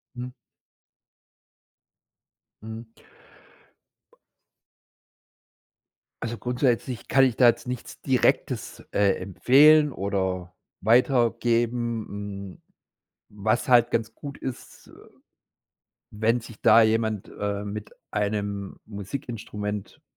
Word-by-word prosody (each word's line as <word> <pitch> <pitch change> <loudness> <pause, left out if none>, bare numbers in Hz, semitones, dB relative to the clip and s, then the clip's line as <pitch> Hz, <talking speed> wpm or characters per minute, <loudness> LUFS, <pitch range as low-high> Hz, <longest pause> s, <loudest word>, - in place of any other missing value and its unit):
Mhm. 125 +1 -6 2.3
Mhm. 110 +1 -9 1.2
Ba - - -27 2.1
Also, 115 +1 -3
grundsätzlich 125 0 -1
kann 135 0 +5
ich 125 -3 +1
da 125 -2 +6
jetzt 120 - +1
nichts 125 -1 -7
Direktes, 130 -2 0
äh, 100 -2 +3
empfehlen 145 - +5
oder 95 -5 -2 0.3
weitergeben. 115 -4 +1
Mm, - - -20 0.7
was 110 +5 -1
halt 120 -2 +5
ganz 115 -1 -1
gut 140 -1 -8
ist, 130 -2 -8
äh, - - -17 1.2
wenn 110 +3 +1
sich 115 -1 -13
da 115 +1 +7
jemand, 110 -2 0
äh, 100 0 -3
mit 105 +1 -6 0.2
einem 100 -1 -2
Musikinstrument 105 -1 -6
115 Hz, 90 wpm, -25 LUFS, 105-120 Hz, 2.3 s, da